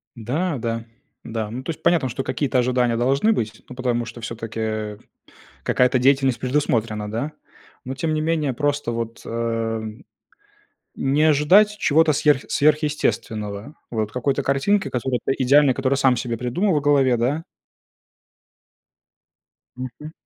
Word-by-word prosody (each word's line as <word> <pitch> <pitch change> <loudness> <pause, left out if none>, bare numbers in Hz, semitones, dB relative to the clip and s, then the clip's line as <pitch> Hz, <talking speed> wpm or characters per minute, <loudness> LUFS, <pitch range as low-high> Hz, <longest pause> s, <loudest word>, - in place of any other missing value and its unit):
Да, 140 - -2
да. 115 -1 -3 0.4
Да. 110 -2 -4
Ну, 125 +3 -5
то - - -9
есть, 160 - -5
понятно, 170 -6 +3
что 130 +3 -4
какие-то 135 -2 -1
ожидания 125 -1 +2
должны 135 - +2
быть, 110 - -3
ну, 125 - -9
потому 120 -2 -1
что 120 0 -9
всё-таки, 115 -1 -6
э, 110 -1 -3 0.7
какая-то 125 0 +2
деятельность 135 0 +3
предусмотрена, 115 -6 0
да. 125 +8 -3 0.5
Но 130 +1 -4
тем 155 +4 -1
не 155 - -1
менее, 155 -4 0
просто 145 -3 -1
вот, 115 0 -4
э, 115 -1 -2 1.1
не 140 +3 +1
ожидать 160 +8 +5
чего-то 160 -3 +3
сверх 150 -2 +3
сверхъестественного. 145 -6 0 0.2
Вот, 110 -3 -2
какой-то 135 +3 -1
картинки, 140 +10 +1
которая 125 0 -1
п - - +2
идеальна, 140 +1 +5
которую 135 +1 0
сам 130 -2 +3
себе 115 0 -3
придумал 155 - 0
в 150 - +1
голове, 140 -4 +3
да? 135 +8 0 2.3
Мгм. 130 +4 -8
130 Hz, 140 wpm, -22 LUFS, 115-145 Hz, 2.3 s, ожидать